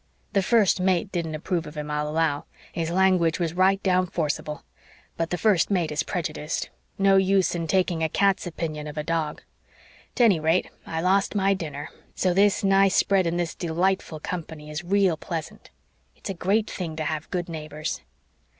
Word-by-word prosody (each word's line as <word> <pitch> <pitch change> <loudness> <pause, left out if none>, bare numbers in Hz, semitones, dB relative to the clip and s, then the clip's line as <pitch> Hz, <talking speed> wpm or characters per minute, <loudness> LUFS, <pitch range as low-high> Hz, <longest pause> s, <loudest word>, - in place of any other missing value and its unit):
The 200 - +3
First 205 -3 +3
Mate 185 +1 +1
didn't 165 -3 -2
approve 165 +1 -2
of 150 +1 -10
him, 150 0 -4
I'll 150 0 -1
allow. 155 -2 0 0.3
His 165 -1 -2
language 180 -2 +3
was 165 -2 -1
right 190 +2 +3
down 185 -1 +2
forcible. 150 -2 -3 0.5
But 165 0 -2
the 180 - -1
First 195 -4 +3
Mate 180 -6 +1
is 150 0 0
prejudiced. 155 -2 -3 0.3
No 195 0 +5
use 190 0 +3
in 165 -2 -3
taking 180 -1 +1
a 160 - +1
cat's 195 +1 +2
opinion 155 -3 -4
of 150 - -8
a 150 - -1
dog. 160 -2 -2 0.7
'Tennyrate, 180 -7 +3 0.2
I 160 0 -2
lost 195 +4 +2
my 195 -1 +3
dinner, 150 -6 -5 0.3
so 185 -1 +1
this 200 +3 +3
nice 195 -1 +4
spread 190 -3 +3
in 170 +1 -1
this 170 -2 -1
dee 170 - -5
lightful 175 -1 0
company 155 -2 -6
is 150 +3 -4
real 190 -2 +2
pleasant. 165 -1 -6 0.5
It's - - -6
a - - -3
great 200 +5 +1
thing 165 -4 -5
to 155 - -3
have 155 0 -3
good 175 -2 -2
neighbors." 155 -2 -5
175 Hz, 180 wpm, -25 LUFS, 155-190 Hz, 0.7 s, No